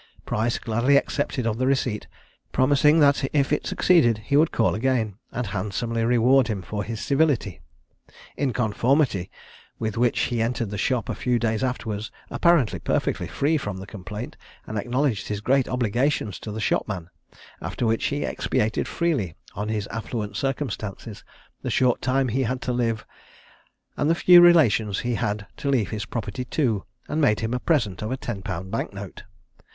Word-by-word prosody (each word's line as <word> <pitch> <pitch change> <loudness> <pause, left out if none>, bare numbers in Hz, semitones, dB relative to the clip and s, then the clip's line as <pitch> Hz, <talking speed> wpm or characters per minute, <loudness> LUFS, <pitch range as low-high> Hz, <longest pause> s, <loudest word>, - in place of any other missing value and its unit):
Price 115 +2 0
gladly 120 +5 +2
accepted 140 -3 -1
of 115 0 -1
the 130 - +1
receipt, 130 -5 0 0.4
promising 145 +4 +4
that 140 -1 +4
if 145 0 +2
it 150 - -1
succeeded, 120 -12 +4
he 140 - 0
would 155 +3 +4
call 115 - +2
again, 110 -4 0
and 125 - -3
handsomely 105 +4 -2
reward 125 +2 +4
him 105 -5 -3
for 105 +3 -4
his 110 0 -5
civility: 140 - +1 0.7
in 140 -3 0
conformity 115 - +1 0.5
with 110 0 -3
which 120 -1 +2
he 120 -2 0
entered 115 -2 -1
the - - -3
shop 120 -2 0
a - - -2
few 125 -1 0
days 115 0 0
afterwards, 110 -4 -3 0.2
apparently 170 -9 +3
perfectly - - -1
free 155 +3 +1
from 105 -9 -4
the 95 - -7
complaint, 105 +3 -7 0.3
and 110 - -3
acknowledged 125 -1 0
his 105 -1 -3
great 130 +4 +2
obligations 125 -2 0
to 110 - -7
the 110 - -5
shopman; 95 -5 -1 0.5
after - - -3
which 115 0 +1
he 145 0 -2
expatiated 110 +1 -1
freely 135 - -1 0.2
on 105 +2 -4
his 105 -2 -1
affluent 115 -2 -4
circumstances, 120 -7 -4 0.4
the - - -3
short 125 -2 +2
time 130 0 +1
he 130 +4 0
had 130 +1 -1
to 125 - -1
live, 115 -2 -1 0.9
and 145 - 0
the 165 - +4
few 175 0 +8
relations 115 - +5
he 120 0 -1
had 105 -3 -2
to 140 - -2
leave 115 -10 +1
his 110 -1 -3
property 115 +1 -4
to, 120 -9 0 0.2
and 155 - -1
made 105 -8 +3
him 115 +1 -2
a 125 - 0
present 115 - 0
of 105 - -3
a 130 - -1
ten 115 -6 -5
pound 95 -2 -5
bank 115 - -2
note. 100 -1 -9
120 Hz, 175 wpm, -24 LUFS, 105-135 Hz, 0.9 s, few